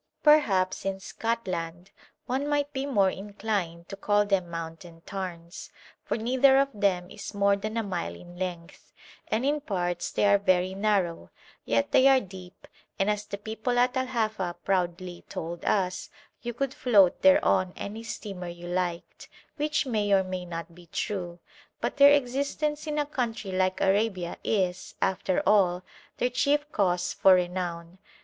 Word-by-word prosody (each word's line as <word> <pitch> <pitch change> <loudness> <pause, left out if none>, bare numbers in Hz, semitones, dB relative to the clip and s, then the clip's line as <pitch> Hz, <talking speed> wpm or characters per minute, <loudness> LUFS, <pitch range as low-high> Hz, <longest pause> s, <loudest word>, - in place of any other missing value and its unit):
Perhaps 205 -12 +4
in 195 0 -2
Scotland 185 -5 -4 0.3
one 265 +3 -1
might 290 0 0
be 270 +1 -2
more 200 -8 +3
inclined 195 -4 -4
to - - -6
call 205 +1 +2
them 195 -4 0
mountain 165 0 -7
tarns, 180 -3 -6 0.3
for - - -2
neither 260 +4 +4
of 275 0 +3
them 190 -4 0
is 205 0 -8
more 200 0 +3
than 215 +3 -4
a 225 - 0
mile 185 -4 -3
in 175 0 -13
length, 175 -1 -6 0.4
and 225 +4 0
in 295 +1 +1
parts 175 - -2
they - - +1
are 200 0 +5
very 185 -1 +2
narrow; 190 - 0 0.4
yet 115 0 +1
they 260 - +6
are 270 -1 +6
deep, 185 -4 -12 0.3
and, 195 +2 +2
as 210 0 -3
the 200 - -5
people 220 +4 -3
at 250 +1 +3
Al 260 0 0
Hafa 215 -7 -1
proudly 180 -1 -1
told 170 +1 -5
us, 185 -3 0 0.3
you 240 - -3
could 265 +3 -2
float 210 -10 +4
thereon 280 - +4
any 210 +3 -6
steamer 205 -5 -6
you 175 0 -8
liked, 175 -1 -3 0.3
which 300 0 0
may 215 -5 0
or 195 -1 +5
may 185 -1 -5
not 170 -1 -7
be 175 0 -16
true, 175 -2 -3 0.4
but - - -3
their 285 0 +8
existence 285 +3 0
in 300 0 -2
a 295 - +1
country 235 -8 -3
like 185 0 0
Arabia 195 -3 +1
is, 185 -4 -1
after 185 -1 0
all, 185 -3 +3 0.3
their 245 - 0
chief 290 +4 +2
cause 180 -3 +1
for 190 -1 +6
renown. 175 -1 -3
195 Hz, 160 wpm, -27 LUFS, 180-235 Hz, 0.4 s, their